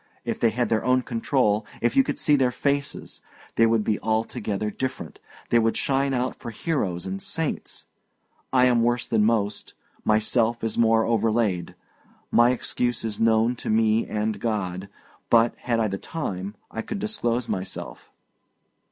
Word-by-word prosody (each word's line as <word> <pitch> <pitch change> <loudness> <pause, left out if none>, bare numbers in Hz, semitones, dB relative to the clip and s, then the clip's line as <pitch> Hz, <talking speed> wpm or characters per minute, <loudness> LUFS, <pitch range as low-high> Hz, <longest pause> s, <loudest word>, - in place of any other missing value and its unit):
If - - -2
they 115 - +4
had 120 +2 -1
their 110 -1 +1
own 130 0 +2
control 115 -3 +1 0.2
if 120 - 0
you 270 - +6
could - - -3
see 150 - +3
their 130 -3 +3
faces, 140 +3 -2 0.3
they 115 - +4
would 115 -1 +2
be 105 0 0
altogether 110 -2 -1
different, 130 +4 -5 0.3
they 120 - +5
would 115 0 +1
shine 135 0 +1
out 130 0 -1
for - - -8
heroes 105 - -2
and 195 0 -4
saints! 165 -6 -3 0.7
I 125 -1 +5
am 120 -2 +4
worse 120 +1 +1
than 110 -2 +2
most; 105 -2 0 0.3
myself 115 +2 +1
is 115 - -1
more 115 -1 +3
overlaid; 110 -6 0 0.6
my 120 +1 +5
excuse 125 -1 -1
is 110 -2 -3
known 115 +2 +3
to - - -6
me 110 0 +2
and 105 -1 -2
God. 100 -4 -3 0.4
But, 115 0 +4
had 115 -2 -1
I 110 - +2
the 95 -1 -4
time, 100 - -5 0.2
I 115 - -3
could 215 - -5
disclose 125 - -1
myself." 95 0 -5
115 Hz, 160 wpm, -25 LUFS, 110-125 Hz, 0.7 s, you